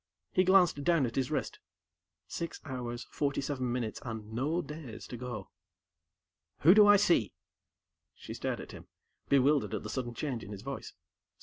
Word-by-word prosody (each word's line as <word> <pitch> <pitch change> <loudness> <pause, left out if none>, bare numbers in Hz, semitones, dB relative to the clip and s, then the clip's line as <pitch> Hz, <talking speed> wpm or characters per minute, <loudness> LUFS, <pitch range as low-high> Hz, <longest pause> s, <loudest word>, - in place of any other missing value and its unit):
He 185 - +3
glanced 180 -6 +4
down 165 -3 +3
at 115 - -4
his 130 -2 0
wrist. - - -2 0.7
Six 170 - -5
hours, 125 -3 -5
forty 140 -2 -1
seven 135 -3 -2
minutes, 120 -3 -3
and 110 -2 -6
no 150 +9 0
days 150 -6 -8
to - - -7
go. 120 -5 -6 1.1
"Who 170 +5 +8
do 210 0 +7
I 205 0 +8
see?" 175 - +3 0.8
She - - -8
stared - - -3
at - - -10
him, - - -11 0.4
bewildered 140 +1 +3
at - - -4
the - - -5
sudden 120 -3 -3
change 130 -4 -3
in 100 - -8
his 100 0 -9
voice. 135 +1 -6
135 Hz, 170 wpm, -31 LUFS, 120-155 Hz, 1.1 s, Who